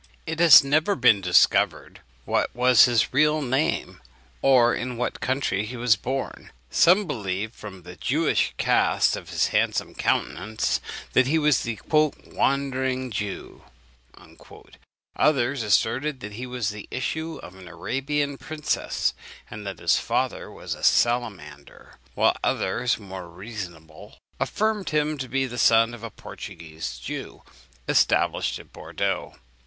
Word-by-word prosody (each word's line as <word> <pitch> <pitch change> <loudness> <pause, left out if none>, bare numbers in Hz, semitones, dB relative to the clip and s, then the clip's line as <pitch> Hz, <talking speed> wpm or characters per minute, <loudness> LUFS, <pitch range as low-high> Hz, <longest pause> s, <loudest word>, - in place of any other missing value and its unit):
It 160 0 -4
has 165 -5 +9
never 155 +8 +2
yet 140 - -8
been 115 -5 +5
discovered 90 -2 +2 0.3
what - - -1
was 125 -2 +6
his 120 -2 +1
real 150 +3 +3
name, 135 +1 -1 0.4
or 120 -3 +5
in 125 -1 -4
what 125 - -3
country 130 -6 -1
he 120 +4 -7
was 120 -2 +3
born. 130 +5 -5 0.2
Some 185 +5 +5
believed, 105 - -3
from 95 -4 -11
the 90 +1 -11
Jewish - - 0
cast - - +2
of - - -9
his - - +1
handsome - - 0
countenance, 110 +3 -1 0.3
that 130 0 +4
he 155 +4 +2
was 150 -2 +3
the 115 -3 -4 0.5
"wandering 130 -2 -1
Jew;" 105 -1 -5 1.5
others 135 -3 +2
asserted 130 +6 +1
that 105 - -7
he 125 +4 -6
was 125 -4 -2
the 105 -1 -8
issue 160 +5 -4
of 90 - -10
an 95 -1 -13
Arabian 135 - -3
princess, 155 -1 -2 0.4
and 105 -1 -7
that 95 -3 -5
his - - +2
father - - -2
was - - -6
a - - -10
salamander; 100 -13 -1 0.2
while - - +3
others, 120 +6 0
more 95 -4 -9
reasonable, 90 -3 -10 0.2
affirmed 215 -3 -1
him 150 -1 0
to 130 -1 -5
be 135 +2 0
the 120 -1 -6
son 115 +1 +4
of 120 - -10
a 115 - -6
Portuguese 80 - -8
Jew - - -7 0.4
established - - +2
at - - -15
Bourdeaux. - - -3
120 Hz, 140 wpm, -24 LUFS, 105-140 Hz, 1.5 s, has